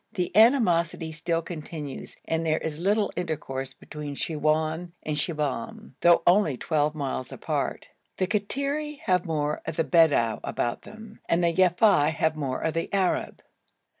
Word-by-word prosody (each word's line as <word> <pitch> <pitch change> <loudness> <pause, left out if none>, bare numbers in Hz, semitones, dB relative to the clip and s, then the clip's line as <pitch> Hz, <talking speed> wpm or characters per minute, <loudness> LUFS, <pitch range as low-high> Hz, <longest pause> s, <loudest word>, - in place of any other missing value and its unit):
The 180 -3 -2
animosity 180 - +4
still 165 +1 -1
continues 155 -4 -7
and 165 0 -1
there 160 -1 +1
is 155 -1 -4
little 205 +4 +1
intercourse 135 -6 -4
between 150 -2 -7
Siwoun 160 +2 -1
and 155 - -2
Shibahm, 155 - -3
though 170 -1 +5
only 175 -7 +4
twelve 150 0 0
miles 135 -3 -3
apart. - - -3 0.3
The 185 - +1
Kattiri 280 +9 -2
have 180 -3 +1
more 150 -2 -1
of 160 - -3
the 165 - +1
Bedou 150 -10 +3
about 120 - -2
them 220 0 -12
and 170 +1 +2
the 170 -1 +3
Yafei 180 -4 +4
have 160 -1 +1
more 135 -4 -3
of 160 - -1
the 165 0 -2
Arab. 190 -2 0
165 Hz, 150 wpm, -26 LUFS, 150-185 Hz, 0.3 s, though